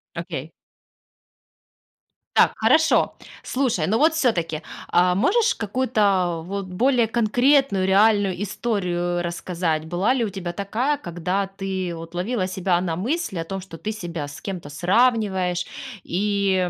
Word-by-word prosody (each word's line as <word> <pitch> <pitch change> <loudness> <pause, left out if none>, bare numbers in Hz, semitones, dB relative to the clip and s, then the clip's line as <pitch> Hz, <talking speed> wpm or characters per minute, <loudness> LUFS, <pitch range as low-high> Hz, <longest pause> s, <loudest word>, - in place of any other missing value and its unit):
Окей. 165 -3 -5 1.8
Так, - - +6
хорошо. 310 +9 +3 0.3
Слушай, 240 - 0
но 220 +3 +2
вот 315 +2 +4
всё-таки, 170 - 0 0.3
а 180 0 +3
можешь 435 - +3
какую-то 200 -7 +1
вот 200 0 -3
более 235 +5 +2
конкретную 240 -2 +2
реальную 200 -1 +3
историю 175 -5 -1
рассказать? 170 -2 -2
Была 180 +9 +1
ли 235 - +1
у - - -3
тебя 180 -3 -5
такая, 235 +10 -1
когда 180 - -2
ты 190 -3 -3
вот 165 +1 -9
ловила 185 +1 -1
себя 185 -2 0
на 170 -3 -2
мысли 235 - -2
о - - -1
том, 195 +3 -5
что 175 -3 -10
ты 215 - -4
себя 170 -8 -5
с 145 - -10
кем-то 180 -7 -6
сравниваешь 185 - +1 0.4
и 195 -1 0
190 Hz, 135 wpm, -23 LUFS, 175-225 Hz, 1.8 s, Так